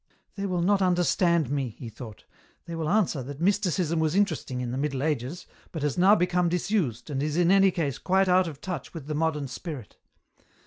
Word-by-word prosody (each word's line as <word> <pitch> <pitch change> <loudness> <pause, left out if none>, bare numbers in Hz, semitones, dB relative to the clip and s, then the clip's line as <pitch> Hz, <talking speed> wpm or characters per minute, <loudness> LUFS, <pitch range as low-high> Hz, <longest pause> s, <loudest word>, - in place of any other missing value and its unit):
" - - -43
They 200 -1 -3
will 180 -2 -1
not 200 +2 +3
understand 175 -4 +2
me," 135 -6 -2
he 125 - -8
thought; 110 -1 -10 0.2
" - - -36
they 170 - -7
will 160 -2 -2
answer 190 -8 +1
that 140 +3 -8
Mysticism 180 -3 +1
was 160 +1 +1
interesting 160 -10 0
in 125 -1 -3
the 130 - -3
Middle 140 -2 -1
Ages, 150 +2 -2 0.3
but 160 -4 -5
has 145 -2 0
now 190 +4 +6
become 180 -2 +1
disused 175 - -1
and 135 -1 -1
is 150 +2 -1
in 175 0 +4
any 195 0 +6
case 150 -7 -2
quite 190 +1 +2
out 185 0 +4
of 150 -3 -8
touch 175 -4 -6
with 155 -5 -7
the 155 - -4
modern 150 -2 -1
spirit. 130 - -8
165 Hz, 215 wpm, -27 LUFS, 140-180 Hz, 0.3 s, now